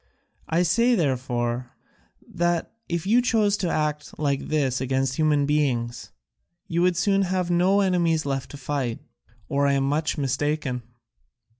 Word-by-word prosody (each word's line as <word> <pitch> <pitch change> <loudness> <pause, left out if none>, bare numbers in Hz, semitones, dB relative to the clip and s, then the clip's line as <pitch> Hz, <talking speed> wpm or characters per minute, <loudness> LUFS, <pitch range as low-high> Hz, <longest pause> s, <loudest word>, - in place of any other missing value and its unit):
I 170 +2 +2
say, 235 +7 +3
therefore, 125 - -1 0.5
that 175 -1 -1 0.2
if 170 0 -2
you 230 +5 +4
chose 215 -4 +2
to 180 - -1
act 150 -2 -2
like 140 -2 -1
this 135 -4 0
against 130 0 0
human 150 -2 +2
beings, 130 -5 -1 0.6
you 170 +1 0
would 180 -1 +2
soon 195 +1 +2
have 185 -2 0
no 185 +4 +3
enemies 170 -5 +1
left 135 -2 -2
to 145 - -9
fight, 135 -4 -2 0.5
or 140 0 +1
I 140 - +3
am 135 -1 +1
much 150 +3 0
mistaken. 140 -1 -1
150 Hz, 145 wpm, -24 LUFS, 135-175 Hz, 0.6 s, you